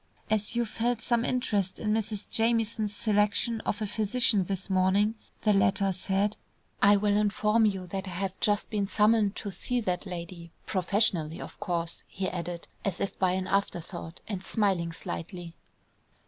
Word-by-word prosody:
"As 215 +1 +1
you 240 0 +2
felt 230 +1 -1
some 235 +1 +1
interest 205 -7 0
in 210 -1 0
Mrs. 215 -2 -2
Jamieson's 225 -2 +1
selection 215 +1 +1
of 210 - -1
a - - 0
physician 210 -1 +2
this 190 0 -2
morning," 190 +3 +3 0.3
the 210 - +4
latter 195 0 +3
said, 195 +3 0 0.4
"I 205 +1 +7
will 205 0 +2
inform 210 +1 +3
you 190 -3 -2
that 190 +2 -4
I 180 - -6
have 190 +1 -3
just 205 0 +1
been 205 -2 0
summoned 210 0 +3
to 200 - -5
see 245 +7 -1
that 180 -1 -2
lady, 170 -1 -7
professionally, 180 -4 +1
of - - -9
course," 170 -2 -2
he 190 0 -3
added, 175 -1 -4 0.2
as 195 -4 -1
if 200 - -3
by 185 -1 +3
an 185 0 -1
afterthought, 175 -3 -2
and 195 -3 -4
smiling 190 -6 +1
slightly. 170 +1 -6
200 Hz, 160 wpm, -29 LUFS, 185-215 Hz, 0.4 s, I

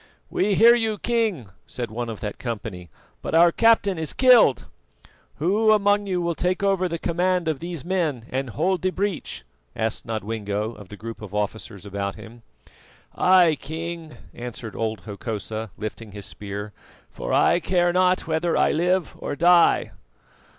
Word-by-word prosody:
"We 200 +1 +1
hear 230 +3 +8
you, 225 -3 0
king," 215 - -1 0.2
said 120 -3 -5
one 120 +1 -4
of 110 - -7
that 105 -2 -5
company, 105 -7 -6 0.3
"but - - -3
our 170 +1 +7
captain 205 -4 +3
is 160 -2 -2
killed." 250 - +5 0.7
"Who 205 +8 +2
among 205 -1 +3
you 180 -2 -1
will 170 0 0
take 180 +3 -1
over 195 -2 +2
the 170 - -2
command 180 +1 0
of 155 -4 -1
these 170 -3 -5
men 165 -10 -1
and 130 0 -2
hold 175 - 0
the 185 - +1
breach?" 195 0 -3 0.3
asked 110 0 -2
Nodwengo 110 -1 -3
of 100 -4 -13
the 105 - -10
group 115 +1 -8
of 105 -1 -8
officers 105 0 -4
about 100 0 -3
him. 115 +2 -12 0.7
"I, 180 -3 +5
King," 165 +1 -6 0.2
answered 120 -2 -7
old 110 -3 -2
Hokosa, 110 +1 -5
lifting 110 -1 -7
his 100 -1 -7
spear, 105 +1 -7 0.4
"for - - -5
I - - +4
care 175 0 +1
not 185 0 +2
whether 165 +1 0
I - - +3
live 180 +1 +1
or - - -4
die." 170 +2 +4
160 Hz, 160 wpm, -24 LUFS, 110-185 Hz, 0.7 s, hear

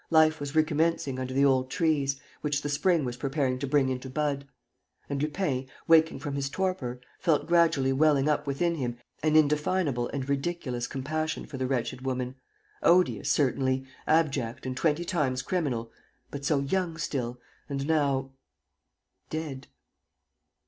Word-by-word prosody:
Life 160 -1 +5
was 145 +1 -5
recommencing 155 -3 +1
under 130 0 -3
the 135 +2 +3
old 130 -1 +3
trees, 140 -4 +1 0.2
which 145 -1 -1
the 145 - -2
spring 155 +1 +2
was 125 0 -4
preparing 135 -1 -1
to 140 - -2
bring 135 -1 +3
into 130 0 -4
bud. 140 0 -1 0.6
And 140 -1 -2
Lupin, 150 -4 -1 0.2
waking 160 0 +5
from 145 -3 -4
his 140 -1 -1
torpor, 145 -8 -2 0.2
felt 160 -5 +2
gradually 165 -6 +3
welling 145 0 +3
up 150 -1 +1
within 170 +5 +1
him 125 -6 -3 0.2
an 155 0 +2
indefinable 150 -3 +2
and 135 -2 -4
ridiculous 140 -4 -2
compassion 155 +4 -3
for 140 - -8
the 130 0 -1
wretched 125 -1 -2
woman, 130 -1 -2 0.5
odious, 175 -4 +3
certainly, 130 -2 +1 0.2
abject 140 -6 +1
and 130 -1 -3
twenty 160 +4 +1
times 135 -8 0
criminal, 130 -10 -1 0.4
but 140 -1 -6
so 140 -1 +2
young 165 +3 -1
still 125 -6 -3 0.3
and 140 -1 -2
now... 140 -4 +1 1.0
dead. 150 -4 -5
140 Hz, 150 wpm, -28 LUFS, 130-155 Hz, 1.0 s, Life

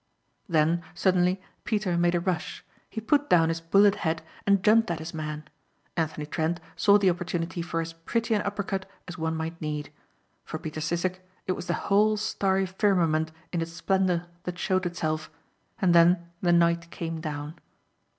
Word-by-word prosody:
Then, 165 +1 +3
suddenly, 180 0 +2 0.2
Peter 210 -6 0
made 175 0 +2
a - - +3
rush. 175 -2 -3 0.2
He 225 - -4
put 290 +6 +1
down 165 -2 +5
his 165 0 -2
bullet 200 +4 +5
head 165 0 -1 0.2
and 200 -1 +4
jumped 225 0 +5
at 170 - -1
his 160 +2 -7
man. 150 -1 -5 0.5
Anthony 160 -2 -2
Trent 160 +3 -1 0.2
saw 205 0 +5
the 195 -3 +4
opportunity 175 0 -3
for 165 -1 -2
as 165 0 -5
pretty 225 +8 -1
an 210 - +2
upper 205 0 -2
cut 195 -1 -4 0.2
as 180 0 -8
one 160 0 -1
might 160 +1 -4
need. 150 -2 -3 0.5
For - - -5
Peter 155 0 -6
Sissek 175 +3 -1 0.3
it - - 0
was 180 - -4
the - - +1
whole 210 +2 +4
starry 195 -2 +1
firmament 175 -5 +1 0.2
in 170 - 0
its 165 0 -4
splendor 185 -1 +1 0.2
that 180 0 -4
showed 185 0 +1
itself, 155 -3 -2 0.5
and 185 -5 +3
then 170 0 +5
the 175 - +3
night 170 0 +3
came 165 -1 -5
down. 150 +1 -5
175 Hz, 175 wpm, -27 LUFS, 165-190 Hz, 0.5 s, down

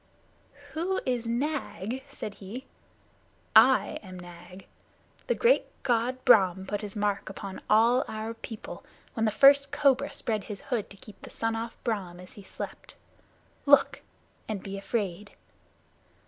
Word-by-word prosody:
"Who 360 +4 -1
is 245 -2 -1
Nag?" 260 -2 -2
said 210 - -7
he. 210 +7 -9 0.9
"I - - +6
am 185 -3 -10
Nag. 175 +1 -12 0.6
The 485 - +2
great 485 +1 +3 0.2
God 250 +1 0
Brahm 190 -6 +5
put 205 +1 -3
his 210 -1 -7
mark 205 -2 -1
upon 195 0 -7
all 230 +4 +5
our 220 +1 -4
people, 225 -1 -9 0.3
when 225 -2 0
the 215 - +2
first 275 +4 +6
cobra 280 -1 +2
spread 215 -4 -3
his 205 -2 -7
hood 235 -6 -3
to 200 - -13
keep 205 0 -14
the - - -10
sun 225 0 -2
off 230 +1 -5
Brahm 195 -7 -3
as 180 0 -12
he 205 - -12
slept. 195 - -8 0.7
Look, 280 -1 +5 0.5
and 210 -3 -3
be 195 0 -6
afraid!" 200 -1 -3
220 Hz, 145 wpm, -28 LUFS, 195-255 Hz, 0.9 s, I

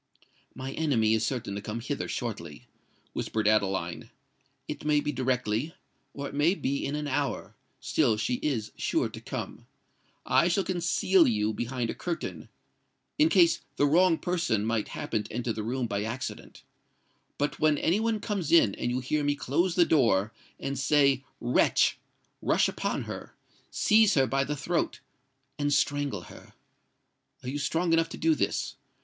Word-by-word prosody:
"My 130 +1 -5
enemy 120 -9 +2
is 110 0 +1
certain 120 -6 -2
to 100 - -4
come 105 +3 -5
hither 140 +4 -3
shortly," 85 - -5 0.5
whispered 110 -1 -1
Adeline: 100 -3 0 0.6
"it - - -6
may 150 -1 +3
be 150 - -2
directly—or 130 +2 -3
it - - -9
may 150 +6 +3
be 140 -6 -2
in 140 - -2
an 150 0 -3
hour;—still 135 -5 -1
she 110 +3 -1
is 120 -8 -1
sure - - 0
to - - -10
come. - - -6 0.6
I 170 - +4
shall 185 +3 +1
conceal 180 0 +3
you 110 -2 +1
behind 120 +1 -2
a - - -5
curtain—in 240 - -4
case 175 - +5 0.2
the 145 - +3
wrong 165 +3 +4
person 170 - 0
might 115 -1 0
happen 110 - -3
to - - -11
enter 120 0 -2
the 110 - -4
room 125 +3 -2
by 100 -3 -2
accident. 120 +5 -6 0.7
But 145 +1 -1
when 155 -1 +3
any 175 +8 +2
one 225 -1 0
comes 200 -7 -3
in, 140 -12 +6
and 120 - -2
you 125 +1 -1
hear 150 +4 -1
me 145 0 +1
close 165 +6 0
the 175 - +5
door 110 -9 +2 0.3
and 140 0 -3
say 140 -3 +3 0.2
'WRETCH!' 120 +1 +3 0.4
rush - - +3
upon - - -2
her—seize 215 -1 0
her 135 -2 +4
by 135 +1 0
the 150 - -2
throat—and 140 -3 -4
strangle 145 -8 +1
her. - - -14 0.9
Are 125 - -4
you 145 +2 -3
strong 165 +4 0
enough 165 0 +3
to - - -7
do 165 0 +3
this? 150 - -2
140 Hz, 155 wpm, -28 LUFS, 115-160 Hz, 0.9 s, in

